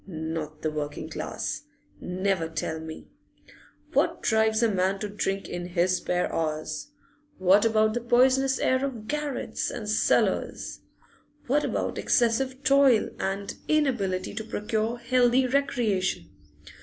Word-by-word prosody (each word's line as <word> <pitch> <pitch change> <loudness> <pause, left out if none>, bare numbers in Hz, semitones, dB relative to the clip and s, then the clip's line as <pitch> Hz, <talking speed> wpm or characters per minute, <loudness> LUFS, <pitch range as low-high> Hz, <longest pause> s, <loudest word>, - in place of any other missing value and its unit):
Not 160 -3 -5
the 155 - 0
working 150 -1 -5
class - - -4 0.4
never 185 -2 -1
tell 160 0 -3
me! 160 0 -9 0.8
What - - +1
drives 220 +1 +3
a - - +5
man 190 0 +1
to 210 - -4
drink 200 -1 -2
in 175 0 -5
his 180 +1 +1
spare 180 0 -1
hours? 155 -1 -2 0.5
What 190 +3 +5
about 215 -1 +3
the 240 - -2
poisonous 260 +3 +3
air 260 +1 +1
of 240 -6 -4
garrets 295 -1 -2
and 220 -3 -6
cellars? 215 - +1 0.7
What 285 +4 +2
about - - -2
excessive 260 +3 +1
toil 270 -4 +4
and 195 +1 -2
inability 235 -12 0
to 220 +1 -4
procure 220 +2 -2
healthy 245 +1 +3
recreation? 225 -10 0
215 Hz, 130 wpm, -27 LUFS, 180-250 Hz, 0.8 s, a